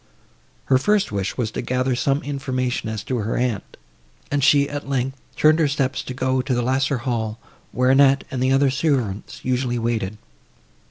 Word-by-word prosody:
Her 130 Hz, -1 st, +4 dB
first 210 Hz, -, +2 dB
wish 100 Hz, -2 st, -2 dB
was 115 Hz, -4 st, -1 dB
to -, -, -3 dB
gather 130 Hz, 0 st, 0 dB
some 140 Hz, +3 st, 0 dB
information, 130 Hz, -4 st, -2 dB
as 110 Hz, -2 st, -4 dB
to 130 Hz, -, -2 dB
her 110 Hz, 0 st, -2 dB
aunt, 120 Hz, -4 st, -2 dB, 0.5 s
and 145 Hz, -1 st, +1 dB
she, 140 Hz, 0 st, +5 dB
at 145 Hz, -1 st, -6 dB
length, 135 Hz, -1 st, -2 dB
turned 155 Hz, +1 st, +4 dB
her 155 Hz, -, +4 dB
steps 135 Hz, -2 st, -1 dB
to 130 Hz, -, -7 dB
go 130 Hz, 0 st, +1 dB
to 130 Hz, -1 st, -1 dB
the 120 Hz, -, 0 dB
lesser 130 Hz, +2 st, +1 dB
hall, 115 Hz, -3 st, -2 dB, 0.3 s
where 125 Hz, +1 st, +2 dB
Annette 135 Hz, 0 st, +5 dB
and 130 Hz, -, -3 dB
the 130 Hz, +1 st, +2 dB
other 135 Hz, 0 st, +3 dB
servants 130 Hz, -9 st, -2 dB
usually 125 Hz, -1 st, 0 dB
waited. 115 Hz, -3 st, -2 dB
130 Hz, 180 wpm, -22 LUFS, 120-140 Hz, 0.5 s, she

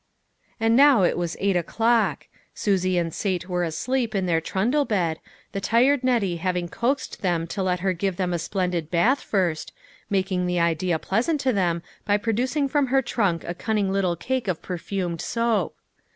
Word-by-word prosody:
And 225 Hz, +1 st, +3 dB
now 270 Hz, -6 st, +6 dB
it 175 Hz, -, +2 dB
was 175 Hz, -1 st, -3 dB
eight 195 Hz, -1 st, +1 dB
o'clock. 225 Hz, +6 st, +1 dB, 0.3 s
Susie 185 Hz, -3 st, +1 dB
and 165 Hz, -2 st, -1 dB
Sate 185 Hz, -3 st, -2 dB
were 180 Hz, -1 st, -1 dB
asleep 230 Hz, +8 st, -1 dB
in 190 Hz, -2 st, +1 dB
their 165 Hz, -2 st, +1 dB
trundle 235 Hz, -, +1 dB
bed, 175 Hz, -, -1 dB, 0.3 s
the 195 Hz, -, -4 dB
tired 245 Hz, +7 st, +3 dB
Nettie 225 Hz, -9 st, +1 dB
having 180 Hz, 0 st, -2 dB
coaxed 265 Hz, +9 st, -2 dB
them 175 Hz, -3 st, 0 dB
to 195 Hz, +4 st, -4 dB
let 180 Hz, -2 st, 0 dB
her 190 Hz, 0 st, +1 dB
give 190 Hz, +1 st, -2 dB
them 180 Hz, -1 st, -1 dB
a 170 Hz, -, -1 dB
splendid 180 Hz, -2 st, -2 dB
bath 225 Hz, +12 st, +2 dB
first, 180 Hz, -6 st, -1 dB, 0.4 s
making 185 Hz, -2 st, 0 dB
the 180 Hz, 0 st, 0 dB
idea 170 Hz, +1 st, +1 dB
pleasant 240 Hz, -, 0 dB
to 260 Hz, -2 st, +1 dB
them 175 Hz, -4 st, 0 dB, 0.2 s
by 205 Hz, 0 st, +2 dB
producing 250 Hz, +7 st, 0 dB
from 285 Hz, 0 st, +1 dB
her 265 Hz, +1 st, +2 dB
trunk 200 Hz, -8 st, 0 dB
a 175 Hz, -, -4 dB
cunning 205 Hz, 0 st, -1 dB
little 190 Hz, -3 st, +1 dB
cake 255 Hz, +6 st, -2 dB
of 180 Hz, -4 st, -2 dB
perfumed 180 Hz, -1 st, -3 dB
soap. 230 Hz, -6 st, 0 dB
190 Hz, 180 wpm, -24 LUFS, 175-230 Hz, 0.4 s, now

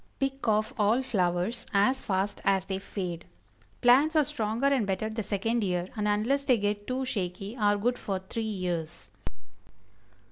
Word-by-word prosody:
Pick 270 Hz, -1 st, -2 dB
off 215 Hz, 0 st, +2 dB
all 220 Hz, +5 st, +3 dB
flowers 195 Hz, 0 st, 0 dB
as 255 Hz, +7 st, +3 dB
fast 195 Hz, +1 st, -1 dB
as 195 Hz, -1 st, +2 dB
they 190 Hz, -1 st, -3 dB
fade. 180 Hz, -4 st, -5 dB, 0.6 s
Plants 275 Hz, +7 st, +5 dB
are 305 Hz, -, +6 dB
stronger 225 Hz, +2 st, -2 dB
and 270 Hz, -7 st, +3 dB
better 210 Hz, +3 st, -1 dB
the 220 Hz, +1 st, -3 dB
second 220 Hz, +3 st, -1 dB
year, 180 Hz, -1 st, -1 dB
and 210 Hz, -1 st, -1 dB
unless 225 Hz, +7 st, +1 dB
they 260 Hz, -3 st, +4 dB
get 205 Hz, 0 st, -2 dB
too 260 Hz, +1 st, -1 dB
shaky, 195 Hz, -1 st, -3 dB
are 205 Hz, -3 st, +2 dB
good 245 Hz, +4 st, 0 dB
for 195 Hz, -2 st, -2 dB
three 190 Hz, +5 st, -5 dB
years. 180 Hz, -, -3 dB
210 Hz, 165 wpm, -28 LUFS, 190-245 Hz, 0.6 s, are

